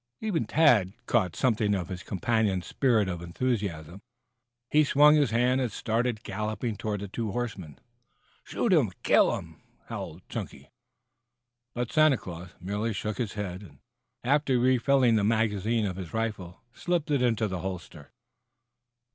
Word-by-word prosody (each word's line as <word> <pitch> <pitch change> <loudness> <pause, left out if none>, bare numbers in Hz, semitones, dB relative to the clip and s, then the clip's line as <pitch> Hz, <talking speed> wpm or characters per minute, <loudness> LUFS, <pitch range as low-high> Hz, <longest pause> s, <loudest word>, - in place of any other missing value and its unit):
Even 200 - -1
Tad 120 - +4
caught 95 -8 +1
something 110 -5 +1
of 90 -3 -4
his 95 -1 -5
companion's 100 -2 0
spirit 115 - +2
of 90 -2 -4
enthusiasm. 90 -3 -3 0.7
He 155 +1 +5
swung 150 +1 +6
his 145 -4 +3
hand 125 +3 +2
and 125 -3 -1
started 115 +2 -1
galloping 110 +3 -3
toward 105 -1 -3
the 100 - -5
two 110 +2 -4
horsemen. 100 - -5 0.7
"Shoot - - 0
'em! - - +3
Kill - - +5
'em!" - - -10 0.3
howled - - -7
Chunky. - - -7 1.0
But 120 -1 -3
Santa 155 -3 +5
Claus 90 -2 -9
merely 105 +5 -2
shook 105 0 -4
his 115 -5 -2
head, 95 -3 -5
and 80 -9 -14 0.5
after 135 0 +2
refilling 125 -1 +3
the 105 - +1
magazine 110 0 +1
of 95 -2 -3
his 95 +1 -7
rifle 105 -6 -4
slipped 175 -4 -1
it 140 -3 +2
into 115 -3 +1
the 95 -2 -4
holster. 90 -5 -7
110 Hz, 145 wpm, -28 LUFS, 95-125 Hz, 1.0 s, swung